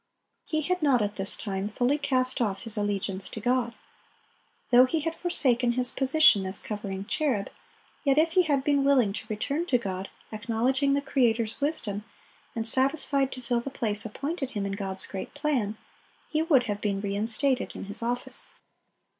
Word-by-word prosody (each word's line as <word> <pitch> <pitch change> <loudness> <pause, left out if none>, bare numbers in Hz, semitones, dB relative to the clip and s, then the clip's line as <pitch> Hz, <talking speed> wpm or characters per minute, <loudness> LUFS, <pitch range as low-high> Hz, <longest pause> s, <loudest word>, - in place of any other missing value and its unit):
He 310 -1 0
had 365 +3 -1
not 265 -7 +3
at 205 0 -3
this 195 0 -1
time 195 -1 -3
fully 245 +7 0
cast 260 -2 +1
off 200 -4 -1
his 225 -2 -1
allegiance 200 -2 -2
to - - -6
God. 245 +1 0 1.0
Though 250 +1 +8
he 315 +4 -1
had 325 +2 -2
forsaken 250 -9 +3
his 250 0 +3
position 270 -6 +5
as 190 - -2
covering 200 -2 -5
cherub, 245 -6 0 0.5
yet 275 -2 +2
if 325 +2 +4
he 365 - +5
had 285 -6 +1
been 285 -1 +2
willing 260 -8 +3
to 220 +1 -6
return 280 +10 -2
to 250 - +3
God, 190 -4 -5 0.2
acknowledging 245 +6 0
the 280 - -1
Creator's 235 -4 +1
wisdom, 220 -9 0 0.5
and 225 0 -2
satisfied 270 +1 +1
to 255 - -9
fill 240 0 0
the 240 - -5
place 220 -5 -2
appointed 275 +5 -4
him 205 -5 -3
in 200 - -3
God's 195 -1 -5
great 195 +6 -7
plan, 265 -8 -1 0.5
he 310 - 0
would 305 -6 +4
have 205 -2 -4
been 200 -2 -1
re 200 0 -3
instated 240 +5 0
in - - -6
his 205 +3 -5
office. 245 +1 -1
245 Hz, 180 wpm, -27 LUFS, 210-280 Hz, 1.0 s, Though